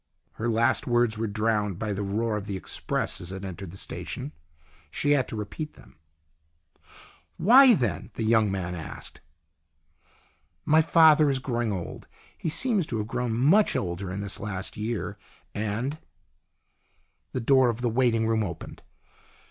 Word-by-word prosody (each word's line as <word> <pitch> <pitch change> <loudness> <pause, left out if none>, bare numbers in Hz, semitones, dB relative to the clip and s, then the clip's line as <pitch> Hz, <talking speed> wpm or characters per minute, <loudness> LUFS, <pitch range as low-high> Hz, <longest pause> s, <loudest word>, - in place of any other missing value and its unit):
Her 120 +2 -3
last 115 +1 +2
words 120 -2 +2
were 115 - 0
drowned 105 -2 0
by 105 0 -2
the 100 - -3
roar 105 +3 -1
of 105 -1 -5
the 100 -2 -3
express - - -2
as 85 +1 -7
it 95 +1 -6
entered 95 0 -7
the 95 - -11
station. 75 - -5 0.6
She 145 - 0
had 140 -3 +3
to - - -5
repeat 110 +9 -5
them. - - -18 0.7
" - - -52 0.6
Why, 250 +4 +7
then? 110 - -2
" - - -44
the 115 - -3
young 110 -2 +3
man 90 -2 -3
asked. 80 -4 -8 0.7
" - - -38
My 155 +1 +5
father 155 -2 +6
is 135 - +2
growing 120 -3 -2
old. 90 -4 -6 0.3
He 160 - -3
seems 205 - +1
to 115 - -3
have 105 - -2
grown 120 -1 -2
much 170 - +4
older 90 +1 -3
in 100 +2 -4
this 100 -1 -3
last 95 -2 -5
year, 110 +1 -4 0.3
and 110 +8 -3 0.6
" - - -45
The 130 - -2
door 130 +1 +4
of 115 +1 -3
the 125 - +1
waiting 115 -1 +2
room 110 0 +1
opened. 85 -5 -7
110 Hz, 170 wpm, -26 LUFS, 100-130 Hz, 0.7 s, Why